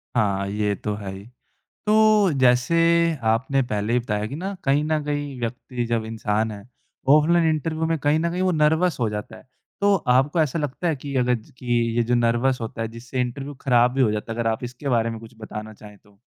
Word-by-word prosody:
हाँ, 100 -4 +1
ये 105 0 0
तो 105 +1 -4
है 100 -2 -6
ही। 95 +1 -10 0.6
तो 215 -2 +4
जैसे 125 +4 +3 0.6
आपने 130 +4 +1
पहले 105 +2 -1
ही 125 - +3
बताया 105 -3 -2
कि 135 - -6
ना, 190 +5 -4
कहीं 140 +2 +2
न 155 -1 0
कहीं 145 -2 -3
व्यक्ति 120 +1 -4
जब 115 -1 -1
इंसान 110 0 -1
है, 100 -1 -9 0.5
ऑफलाइन 160 +3 +5
इंटरव्यू 160 +1 -1
में 165 0 0
कहीं 145 +3 +2
न 170 - 0
कहीं 180 +2 -2
वो 185 -1 +2
नर्वस 160 +1 +2
हो 115 -3 +1
जाता 105 0 -6
है। - - -18 0.3
तो 200 0 +4
आपको 135 +6 +3
ऐसा 155 +1 0
लगता 145 +4 -3
है 160 - +1
कि 140 +1 -7
अगर 125 -1 +2
ज 110 - -12
कि - - -13 0.3
ये 120 - +3
जो 120 +1 +1
नर्वस 120 +2 +1
होता 115 0 -5
है 115 - -1
जिससे 120 +3 -5
इंटरव्यू 135 +4 -4
खराब 125 -2 +4
भी 135 - +1
हो 110 -4 +3
जाता 105 +1 -4
है, - - -9
अगर 115 -1 +1
आप 110 - -4
इसके 125 +3 -5
बारे 115 -2 +2
में 115 -1 -6
कुछ 115 0 -13
बताना 110 0 -7
चाहें 105 -1 -14
तो? 100 0 -26
125 Hz, 225 wpm, -23 LUFS, 110-150 Hz, 0.6 s, ऑफलाइन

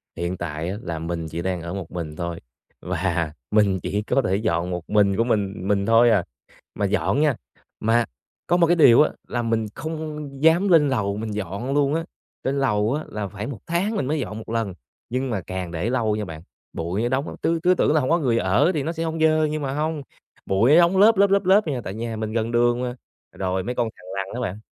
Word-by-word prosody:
Hiện 85 +2 -3
tại 80 0 -4
á, 100 - -4
là 85 -2 -4
mình 85 0 -4
chỉ 80 +2 -5
đang 90 -1 -2
ở 85 +2 -5
một 95 -4 -6
mình 80 -4 -5
thôi, 85 0 -4 0.4
và 85 -3 -1 0.2
mình 100 -3 +3
chỉ 105 +1 -1
có 135 +5 +1
thể 95 - 0
dọn 90 -4 0
một 90 -1 -5
mình 100 -2 +3
của 115 - +3
mình 105 -5 0
mình 100 -1 +1
thôi 115 +1 +5
à. 100 -6 +3 0.5
Mà - - 0
dọn 95 - +1
nha, 150 -5 +3 0.4
mà 115 +1 +2 0.4
có 175 - +3
một 170 -2 +4
cái 175 - +4
điều 140 -6 +7
á 150 - +4 0.2
là 120 - -2
mình 115 -1 0
không 155 -2 -5
dám 170 +5 +5
lên 155 -4 +5
lầu 105 -6 -1
mình 110 0 -4
dọn 105 +6 -3
luôn 145 0 +2
á, 165 - -1 0.4
trên 140 +1 0
lầu 105 -2 +1
á 155 - -2
là 105 -2 -4
phải 100 +2 -6
1 125 -7 -6
tháng 190 +6 0
mình 195 - -1
mới 150 +2 -1
dọn 110 -5 -4
1 110 - -9
lần. 115 -5 -1 0.4
Nhưng 130 +2 -2
mà 100 -5 -2
càng 90 -1 -5
để 90 +7 -2
lâu 115 -4 +1
nha 105 - -3
bạn, 80 -3 -8 0.3
bụi 90 +6 -2
nó 120 - 0
đóng, 135 +3 -2
tứ 165 0 +1
cứ 180 +1 +5
tưởng 155 - +2
là 155 - +4
hông 130 - -1
có 170 +1 +3
người 120 -6 +1
ở 115 - +3
thì 145 -3 -1
nó 165 - -2
sẽ 165 -1 -4
hông 165 0 -3
dơ 155 0 +4
nhưng 155 0 -2
mà 135 -1 -2
hông, 155 0 -2 0.4
bụi 105 +8 +3
nó - - +7
đóng 175 +2 +5
lớp, 210 +2 +6
lớp, 200 0 +5
lớp, 200 0 +3
lớp 195 +3 +6
vậy 150 - -1
nè, 125 - -3
tại 95 - -5
nhà 115 0 -4
mình 110 0 -3
gần 115 0 -1
đường 120 +1 +2
mà. 125 0 -3 0.4
Rồi 95 0 -2
mấy 125 +4 -3
con 120 -2 0
thằn 90 - -17
lằn 95 -1 -2
á 125 - -4
bạn, 105 - -10
115 Hz, 250 wpm, -23 LUFS, 95-150 Hz, 0.5 s, điều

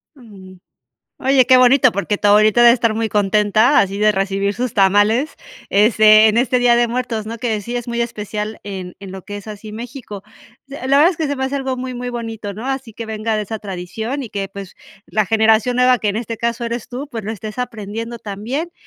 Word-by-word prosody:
Mm. 195 -7 -14 0.6
Oye, 265 -1 +3
qué 255 0 +6
bonito, 255 0 +5
porque 200 +1 -2
tu - - 0
abuelita 215 +3 +5
debe 235 - +8
estar 230 -2 0
muy 225 0 -1
contenta, 210 +6 +3
así 195 0 +1
de 215 0 +4
recibir 195 0 -1
sus 245 +1 -3
tamales, 205 +8 +2 0.3
este, 215 +1 +6
en 220 +1 +2
este 250 +1 +2
Día 245 -1 +4
de 240 0 +2
Muertos, 235 -3 -3
¿no? 230 +1 -6
Que 220 -3 -2
sí 240 +4 -5
es 240 -1 -4
muy 235 0 -3
especial 215 -2 -4
en 190 -3 -7
en 195 -1 -10
lo 190 - -8
que 205 +2 -8
es 205 - -10
así 215 0 -9
México. 225 -2 -8 0.4
S 275 -1 -7
la 275 - +4
verdad 310 +5 +6
es 360 - -7
que 320 -3 -2
se 285 - -2
me 265 - -2
hace 265 +1 -3
algo 265 -2 -2
muy 255 0 -5
muy 245 0 -5
bonito, 225 -4 -6
¿no? 220 +5 -7
Así 265 -3 -4
que 230 +1 -7
venga 220 0 -2
de 215 - -1
esa 215 +1 -6
tradición 210 +8 -5
y 225 - -10
que, 195 -1 -4
pues, 195 -1 -10 0.3
la 215 -1 0
generación 220 +3 +2
nueva 250 0 +4
que 215 - -1
en 200 - -1
este 230 0 -4
caso 235 0 -2
eres 235 0 -4
tú, 255 +4 -6
pues, 230 -5 -6
lo 210 - -5
estés 215 -1 -7
aprendiendo 230 0 -5
también. 230 - -5
225 Hz, 225 wpm, -18 LUFS, 205-245 Hz, 0.6 s, debe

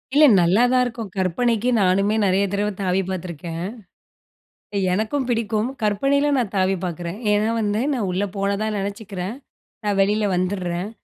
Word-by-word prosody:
இல்ல 305 +1 +8 0.2
நல்லாதான் 245 +9 +4
இருக்கும். 230 -4 -5
கற்பனைக்கு 225 +6 +1
நானுமே 195 +3 +2
நிறைய 190 +1 +2
தடவ 205 +1 0
தாவி 185 0 +1
பார்த்துருக்கேன். 170 -2 -5 1.3
எனக்கும் 235 +6 -1
பிடிக்கும். 225 0 0
கற்பனையில 275 +8 +2
நான் 230 -6 -1
தாவி 190 +1 +2
பார்க்குறேன். 175 +3 -5
ஏன்னா 210 +2 +2
வந்து 210 +1 0
நான் 220 -7 -1
உள்ளே 195 +3 -1
போனதா 200 +2 0
நினச்சிக்கிறேன் 200 0 -5 0.5
நான் 205 -1 +1
வெளியில 210 +1 +2
வந்துர்றேன். 180 0 -2
205 Hz, 130 wpm, -22 LUFS, 185-220 Hz, 1.3 s, இல்ல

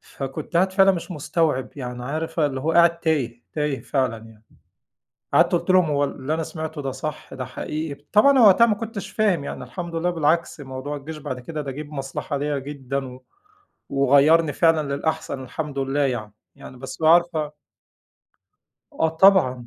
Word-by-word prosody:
فكنت 140 +5 -7
قاعد 185 +2 +3
فعلًا 195 0 +5
مش 180 +1 -5
مستوعب، 155 -3 -1
يعني 125 -2 -6
عارفة 160 +3 -1
اللي 135 -2 -4
هو 160 +4 0
قاعد 170 0 +4
تايه، 130 -8 -1
تايه 150 -3 -1
فعلًا 130 -5 0
يعني. 110 -1 -16 0.9
قعدت - - +5
قُلْت - - 0
لهم 185 -1 +6
هو 145 -1 +2
ال 140 - -2
اللي 140 +4 -2
أنا 165 - -2
سمعته 160 -1 -6
ده 135 -1 -3
صح؟ 150 +4 -6
ده 130 - -4
حقيقي؟ 150 +2 -5
طبعًا 215 +7 +6
أنا 270 - +4
وقتها 200 +4 +7
ما 220 - +2
كنتش 220 -1 -6
فاهم، 195 -9 +1
يعني - - -6
الحمد 175 -2 -7
لله 170 +2 0
بالعكس 165 -1 0
موضوع 135 +1 -6
الجيش 155 +2 -8
بعد 140 -4 -5
كده 150 +4 -5
ده 140 - -5
جه 145 +3 -6
بمصلحة 145 0 -5
ليّا 145 0 -1
جدًا، 135 -1 -4
و 130 0 -16 0.7
وغيّرني 145 +4 +4
فعلًا 155 -2 +2
للأحسن 140 -2 -3
الحمد 145 +2 -5
لله 135 +1 -1
يعني. 120 -7 -1 0.2
يعني 130 - -12
بس 130 0 -7
بقى 160 -1 +4
عارفة 170 -3 0 1.4
آه 160 - +1
طبعًا. 160 -8 +4
150 Hz, 175 wpm, -23 LUFS, 135-165 Hz, 1.4 s, وقتها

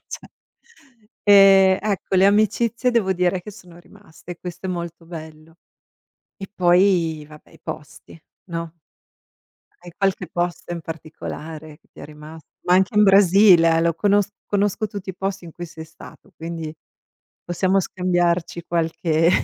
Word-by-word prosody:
cioè. - - -9 1.0
E, 195 -2 +6
ecco, 200 -2 -2
le 190 +1 +5
amicizie 225 +4 +1
devo 220 -6 +1
dire 180 0 0
che 210 - -10
sono 180 -4 -15
rimaste, 175 -2 -13
questo 180 +1 -8
è - - -4
molto 170 -1 -6
bello. 160 -1 -11 0.8
E 195 - -9
poi 175 -4 +2
vabbè, 150 0 -16
i - - -19
posti, 155 +2 -10 0.3
no? 165 -1 -5 1.1
Hai 175 -1 -12
qualche 195 -2 -1
posto 175 0 -3
in 170 - -5
particolare 155 -1 -8
che - - -36
ti - - -14
è - - -8
rimas 150 +2 -12 0.2
ma 180 - +2
anche 190 +3 +2
in 210 - +6
Brasile 195 -4 +6
eh, - - +2
lo 170 0 +2
conos 205 +1 +2 0.2
conosco 205 +1 0
tutti 200 -2 -7
i - - -12
posti 195 -1 -4
in 165 - -11
cui 175 +2 -8
sei 160 -1 -10
stato, 160 - -16
quindi 165 -1 -6 0.7
possiamo 185 +2 +1
scambiarci 175 -2 -1
qualche 165 -1 +1
175 Hz, 150 wpm, -21 LUFS, 165-195 Hz, 1.1 s, E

